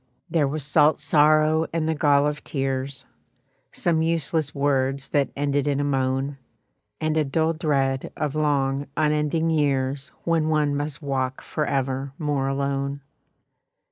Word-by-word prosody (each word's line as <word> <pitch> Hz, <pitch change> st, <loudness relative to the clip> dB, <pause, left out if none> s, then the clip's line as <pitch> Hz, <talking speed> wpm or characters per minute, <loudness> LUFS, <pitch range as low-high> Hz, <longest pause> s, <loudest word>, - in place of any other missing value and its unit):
There 155 Hz, -5 st, +2 dB
was 145 Hz, 0 st, -3 dB
salt 150 Hz, +1 st, +4 dB
sorrow 155 Hz, +1 st, +3 dB
and 165 Hz, -1 st, -1 dB
the 160 Hz, -, +1 dB
gall 145 Hz, -2 st, +3 dB
of 150 Hz, 0 st, -2 dB
tears, 135 Hz, -1 st, -3 dB, 0.7 s
Some 165 Hz, -2 st, 0 dB
useless 160 Hz, -2 st, 0 dB
words 135 Hz, -1 st, 0 dB
that 140 Hz, -2 st, +1 dB
ended 145 Hz, 0 st, 0 dB
in 140 Hz, -1 st, +1 dB
a -, -, +1 dB
moan, 135 Hz, 0 st, -1 dB, 0.6 s
And 155 Hz, 0 st, 0 dB
a 155 Hz, -, +3 dB
dull 160 Hz, +3 st, +1 dB
dread 135 Hz, -5 st, 0 dB
of 150 Hz, -2 st, -1 dB
long 140 Hz, -2 st, 0 dB
unending 150 Hz, +2 st, +1 dB
years 135 Hz, -3 st, 0 dB
When 165 Hz, -2 st, +1 dB
one 150 Hz, -2 st, +1 dB
must 150 Hz, +2 st, -4 dB
walk 130 Hz, -2 st, -2 dB
forever 135 Hz, -2 st, -2 dB
more 145 Hz, -3 st, -1 dB
alone. 140 Hz, 0 st, -2 dB
145 Hz, 140 wpm, -24 LUFS, 135-155 Hz, 0.7 s, salt